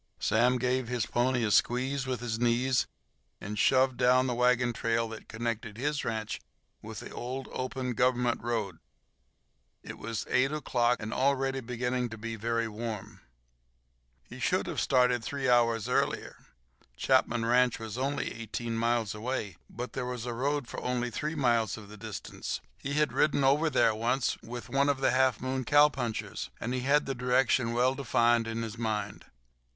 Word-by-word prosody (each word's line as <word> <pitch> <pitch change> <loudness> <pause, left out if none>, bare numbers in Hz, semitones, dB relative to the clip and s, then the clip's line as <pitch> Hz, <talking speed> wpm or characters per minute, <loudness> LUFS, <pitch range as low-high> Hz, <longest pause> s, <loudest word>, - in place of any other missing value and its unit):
Sam 120 +4 +3
gave 125 0 0
his 120 -2 -1
pony 120 0 +1
a 105 - +1
squeeze 130 +5 +2
with 125 -2 -2
his 115 -2 -3
knees 120 +1 +2 0.5
and 105 +1 -5
"shoved" 130 +1 +4
down 130 +1 +4
the 125 - 0
wagon 125 0 +2
trail 115 0 0
that 110 -1 -9
connected 115 -1 -4
his 145 +3 -1
ranch 110 -1 -3 0.4
with - - -8
the - - -9
old, 130 +2 -5
open 130 0 -3
Government 125 0 +1
road. 110 -7 -2 1.0
It - - -9
was 110 0 -4
eight 130 +2 +2
o'clock, 125 -5 +1
and 110 +2 -5
already 135 0 +1
beginning 125 0 -2
to 115 - -8
be 115 +1 -5
very 115 +1 -1
warm. 110 -1 -6 1.0
He - - -11
should - - +1
have - - -2
started 125 -2 +3
three 135 +1 -2
hours 115 -3 +3
earlier. - - -1 0.5
Chapman 115 - +2
ranch 125 +1 +3
was 110 -1 -6
only 140 +3 -2
eighteen 115 +1 -4
miles 115 -2 +1
away, 105 -4 -3
but 125 +2 -6
there 125 -2 -3
was 125 -2 -4
a 120 - -3
road 140 +2 -1
for - - -6
only 125 -1 -1
three 155 +7 -3
miles 120 -7 +1
of 105 -2 -11
the 105 - -10
distance. 110 -1 -5 0.2
He 140 - -4
had 150 0 +1
ridden 145 -2 +2
over 145 +4 +4
there 115 - +3
once 120 +3 0
with 120 +1 -7
one 140 +1 +2
of 140 -2 +1
the 135 - +3
Half 130 -2 +3
Moon 130 +1 -2
cowpunchers, 135 -4 +2
and 120 - -3
he 130 - 0
had 140 +4 +2
the 135 - -2
direction 125 -1 +2
well 125 +2 +3
defined 120 -3 +2
in 115 0 -3
his 115 0 -6
mind. 105 -3 -3
120 Hz, 170 wpm, -30 LUFS, 115-130 Hz, 1.0 s, shoved